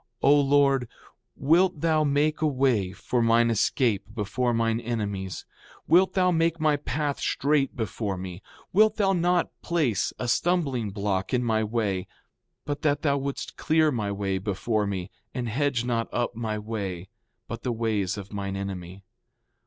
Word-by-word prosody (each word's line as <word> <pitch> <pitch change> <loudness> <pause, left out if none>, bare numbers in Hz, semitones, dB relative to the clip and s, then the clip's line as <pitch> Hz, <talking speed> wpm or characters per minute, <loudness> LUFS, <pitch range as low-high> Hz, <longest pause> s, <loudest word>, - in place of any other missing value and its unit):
O 140 - +7
Lord, 140 -3 +3 0.5
wilt 165 +3 +3
thou 160 -2 +3
make 150 +2 +1
a 155 - +3
way 130 -9 +1
for 120 +6 -1
mine 115 0 +4
escape 115 -1 +1
before 115 +3 -1
mine 115 -1 +1
enemies! 100 -5 -4 0.4
Wilt 180 +4 +5
thou 180 -1 +3
make 165 0 +1
my 155 -2 +3
path 145 0 -2
straight 140 0 +1
before 105 -3 -3
me! 90 0 -7 0.3
Wilt 215 +2 +5
thou 195 -2 +2
not 175 0 +1
place 150 - 0
a - - -3
stumbling 135 - +1
block 100 +2 -1
in 125 - +1
my 110 -2 +1
way—but 110 +6 -5
that 145 -1 +1
thou 140 -2 +2
wouldst 140 0 -5
clear 155 -1 +3
my 105 -6 -2
way 100 -1 -1
before 105 +2 -1
me, 95 -1 -4 0.2
and 125 -2 -2
hedge 125 +1 0
not 115 -2 -1
up 120 -1 -1
my 110 -2 -2
way, 100 -4 -4 0.4
but 115 0 -6
the 125 - -2
ways 110 -5 -1
of 100 +1 -8
mine 100 -1 -3
enemy. 95 -1 -6
120 Hz, 155 wpm, -26 LUFS, 105-145 Hz, 0.5 s, O